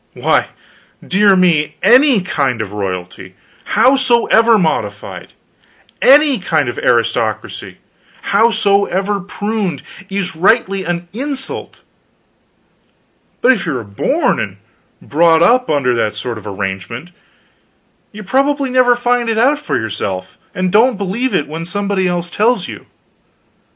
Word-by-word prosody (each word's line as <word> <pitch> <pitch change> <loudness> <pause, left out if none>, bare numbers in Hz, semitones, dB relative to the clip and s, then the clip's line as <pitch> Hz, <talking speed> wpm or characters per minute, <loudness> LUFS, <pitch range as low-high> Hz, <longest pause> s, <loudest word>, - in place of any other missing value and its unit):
Why, - - +1 0.6
dear 200 +1 +4
me, 170 -5 +2
any 260 -3 +5
kind 140 -9 -1
of 110 -3 -5
royalty, 90 -3 -6 0.3
howsoever 235 -3 +3
modified, 195 - -3 0.7
any 280 -2 +5
kind 185 - 0
of - - -4
aristocracy, - - -1 0.6
howsoever 200 -3 +2
pruned, 200 -4 -4 0.3
is 195 -2 -3
rightly 195 +2 +1
an 175 0 -3
insult; 270 +2 -5 1.6
but 255 - +5
if 235 -7 0
you 145 -5 -1
are 120 - -6
born 100 -1 -1
and - - -5 0.5
brought 165 +2 +3
up 250 +7 +3
under 140 -5 +1
that 110 -3 -1
sort 120 -3 -5
of 105 - -12
arrangement 100 - -5 1.0
you 210 0 -10
probably 275 +5 0
never 250 -1 +4
find 245 -1 0
it 225 - -1
out 275 +6 +3
for 300 - -2
yourself, 100 -4 -5 0.2
and 185 0 -1
don't 230 +3 +3
believe 205 +7 -2
it 145 - 0
when 160 +2 -6
somebody 195 +1 -2
else 175 -1 -3
tells 215 -1 +1
you. - - -10
195 Hz, 125 wpm, -15 LUFS, 155-245 Hz, 1.6 s, any